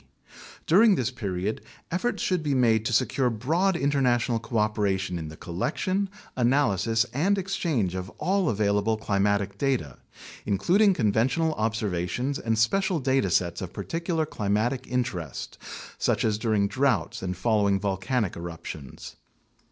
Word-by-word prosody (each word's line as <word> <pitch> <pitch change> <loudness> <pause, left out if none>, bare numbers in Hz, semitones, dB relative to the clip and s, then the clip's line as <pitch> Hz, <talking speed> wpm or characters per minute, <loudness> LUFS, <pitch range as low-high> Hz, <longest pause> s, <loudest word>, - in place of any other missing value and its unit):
During 205 +5 +6
this 125 -4 -1
period, 100 -3 -3 0.3
efforts 185 +8 -1
should 180 -3 +1
be 145 -3 0
made 115 -4 +3
to 120 - 0
secure 130 +2 +2
broad 160 - +1
international 125 -5 +1
cooperation 105 -5 -1
in 80 - -5
the 80 0 -10
collection, 185 - -2 0.3
analysis, 120 -3 +2
and 185 +10 +2
exchange 165 - -1
of 95 0 -4
all 190 -3 +1
available 105 +1 +1
climatic 100 -1 0
data, 85 - -1 0.4
including 180 - +3
con 110 -9 +2
ventional 155 +9 +1
observations 110 +3 -1
and 115 -1 -1
special 185 - +2
data 130 -6 +1
sets 85 -1 0
of 95 - -6
particular 165 -1 -2
climatic 120 +2 -1
in 125 0 +1
terest 90 - -6 0.4
(such - - +1
as 105 -1 +1
during 110 -3 +1
droughts 130 -6 0
and 90 -1 -3
following 100 -1 +2
volcanic 100 +2 -1
eruptions). 85 -5 -8
115 Hz, 135 wpm, -26 LUFS, 100-140 Hz, 0.4 s, During